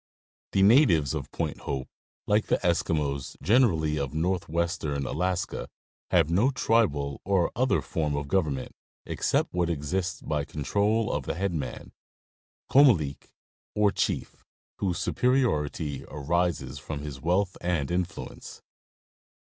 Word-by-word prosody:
The 95 - +4
natives 100 - +5
of - - -5
Point - - -3
Hope, 65 -2 -4 0.4
like 105 +1 +2
the - - +3
Eskimos 75 -6 0
generally 85 - +3
of 70 +1 -3
north 90 +3 -1
western 80 -4 -1
Alaska, 90 +6 -2 0.4
have 75 - +3
no 105 +10 +4
tribal 95 - +1
or 95 -3 +2
other 130 +2 +2
form 75 -3 -1
of 70 0 -3
government 75 -7 0 0.3
except - - 0
what 90 -1 +1
exists 85 +4 -2
by 75 -2 -2
control 100 - 0
of - - -3
the - - -2
head 95 +1 -1
man, 80 - -5 0.8
oomalik, 95 - +4 0.5
or 105 -1 +4
chief, - - -2 0.4
whose 90 -3 0
superiority 85 - 0
arises 75 -2 -1
from 70 +2 -6
his 70 -3 -7
wealth 90 +3 +1
and 85 -5 0
influence. 90 0 -4
85 Hz, 125 wpm, -27 LUFS, 75-100 Hz, 0.8 s, natives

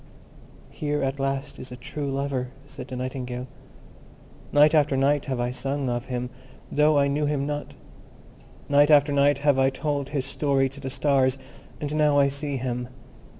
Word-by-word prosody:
"Here 145 -1 -2
at 135 +1 -2
last 135 0 -2
is 130 - -9
a - - -6
true 140 +3 -5
lover," 135 -2 -2 0.2
said - - -9
the 130 - -6
Nightingale. 125 -1 -4 1.1
"Night 150 +1 +6
after 145 -3 +3
night 140 +1 +2
have 130 -3 -2
I 120 0 0
sung 135 +1 -2
of 120 +1 -2
him, 125 -1 -4 0.4
though 150 0 +4
I 140 0 +4
knew 145 +1 0
him 145 -2 0
not: 145 0 -4 0.9
night 145 +1 +5
after 145 -1 +5
night 140 0 +4
have 140 -1 +2
I 135 0 +4
told 140 -1 -2
his 140 -3 -2
story 135 -1 +1
to 135 +2 -11
the 135 -1 -5
stars, 135 -1 +2 0.4
and 150 0 -3
now 150 -1 +3
I 140 -1 +5
see 140 0 -3
him. 125 -1 -3
140 Hz, 175 wpm, -25 LUFS, 130-145 Hz, 1.1 s, Night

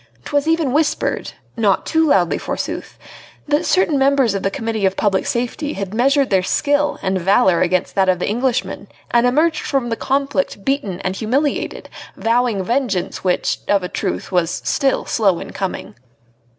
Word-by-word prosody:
'Twas 285 +1 0
even 325 -5 +1
whispered 305 +1 0 0.2
not 210 -5 +1
too 320 0 +2
loudly, 180 - +2
forsooth - - -5 0.5
that 295 +3 +1
certain 330 -6 +2
members 270 -5 +3
of 195 - -2
the 195 - 0
Committee 225 +1 -3
of 190 0 +1
Public 195 -2 +1
Safety 250 +5 -2
had 195 0 -5
measured 270 +2 +2
their 190 -1 +4
skill 290 +9 +1
and 190 -1 0
valour 190 -1 +3
against 185 +1 0
that 190 -1 +2
of 185 - +3
the 180 - -3
Englishman 245 +3 -1 0.2
and 240 +1 +4
emerged 310 +5 +2
from 270 -4 -1
the 230 - -1
conflict 275 -5 -1
beaten 210 -10 -1
and 185 +1 -3
humiliated, 275 +6 -1 0.3
vowing 230 -3 +1
vengeance 230 -4 -1
which, 180 -1 0
of 200 -2 +2
a - - -2
truth, - - -3
was 175 -2 0
still 270 -1 +1
slow 195 -6 +1
in - - -8
coming. 190 -1 -4
235 Hz, 165 wpm, -19 LUFS, 190-280 Hz, 0.5 s, their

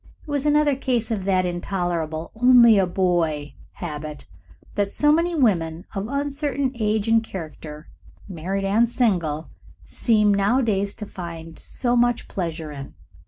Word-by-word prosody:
It - - -21
was 290 0 0
another 295 -1 +3
case 245 -4 -1
of 200 -4 -2
that 185 -2 +2
intolerable 175 -3 -3
"only 235 -2 +6
a 190 - +2
boy" 170 -5 0 0.2
habit 150 -3 -7 0.5
that 200 -1 0
so 295 +8 +2
many 335 +2 +2
women 175 - +1
of 200 0 -3
uncertain 280 -1 -1
age 215 -2 0
and 225 0 +4
character, 155 -5 -8 0.4
married 190 +2 -3
and 220 +4 +3
single, 170 - 0 0.3
seem 210 -3 +2
nowadays 200 -1 +1
to 210 - -6
find 165 -4 -8
so 245 -1 -1
much 240 0 +2
pleasure 165 -4 -4
in. 140 -2 -9
200 Hz, 140 wpm, -23 LUFS, 170-240 Hz, 0.5 s, only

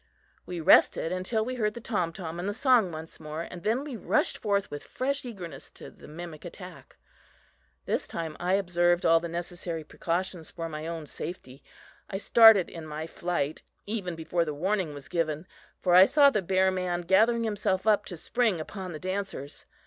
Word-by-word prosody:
We 180 -1 -4
rested 160 +1 +5
until 185 +5 -1
we 255 - -3
heard 215 -4 -1
the - - -5
tom 205 -8 -1
tom 165 -1 -6
and 185 +3 -2
the 205 - -3
song 250 -7 +4
once 160 0 -8
more, 155 +1 -5
and 175 0 -9
then 225 +8 0
we 290 -4 -6
rushed 210 -1 +1
forth 200 -2 0
with 145 - -5
fresh 275 +2 -2
eagerness 190 -9 -8
to - - -9
the - - -15
mimic 160 0 -9
attack. - - -11 0.9
This - - -1
time 160 -2 -4
I 180 +1 0
observed 175 -2 +2
all 165 0 +6
necessary 170 -1 -4
precautions 170 +2 -3
for 165 -1 -5
my 155 0 -6
own 165 -2 -5
safety. 140 -3 -8 0.5
I 195 - -3
started 220 -2 +7
in 165 -2 -9
my 155 +1 -5
flight 165 -3 -2 0.2
even 200 -5 -3
before 165 +1 -1
the 150 -3 -4
warning 185 -1 -1
was 145 - -8
given, 160 -2 -1 0.3
for 180 - +1
I 185 +1 +10
saw 285 +4 +5
the 210 - 0
bear 190 +1 +2
man 180 -1 -1
gathering 220 +7 +3
himself 205 -3 -1
up 210 -1 +4
to 175 - -6
spring 225 0 0
upon 185 +2 -6
the 155 - -6
dancers. 185 -6 -4
180 Hz, 185 wpm, -28 LUFS, 165-205 Hz, 0.9 s, I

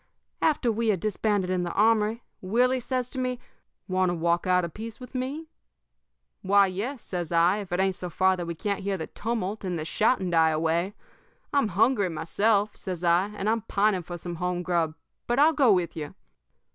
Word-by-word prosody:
"After 285 -6 +2
we 225 +1 -1
had 205 -5 +2
disbanded 205 -1 0
in 185 -1 0
the 175 -1 -2
armory, 220 +1 +2 0.2
Willie 245 +7 +2
says 250 0 -2
to 260 - -4
me: 255 -1 -1 0.5
"'Want 185 -1 +1
to 175 - -1
walk 170 +2 0
out 180 -1 +3
a - - -5
piece 220 +6 -8
with 250 0 -11
me?' 270 +5 -4 0.9
"'Why, 200 +1 +5
yes,' 215 +8 -4
says 175 -3 -4
I, 170 +3 +4
'if 200 -4 -8
it 175 - 0
ain't 190 0 +2
so 180 -1 -6
far 190 +2 +2
that 175 -2 -5
we 170 - -4
can't 200 +4 -2
hear 195 0 -2
the 160 - -4
tumult 220 -2 -3
and 180 -2 -2
the 155 - -4
shouting 195 +1 +1
die 165 -1 +4
away. 165 +5 0 0.6
I'm 280 -5 +3
hungry 210 +1 +2
myself,' 200 +6 +1
says 180 -3 -6
I, 175 +3 +3
'and 205 - -3
I'm 225 +1 +1
pining 205 -2 +1
for 175 +1 -7
some 170 0 -6
home 180 +1 -2
grub, 170 -3 0 0.3
but 240 - 0
I'll 305 +3 +5
go 275 -6 +4
with 180 -4 +1
you.' 150 -2 -6
195 Hz, 200 wpm, -26 LUFS, 175-225 Hz, 0.9 s, Why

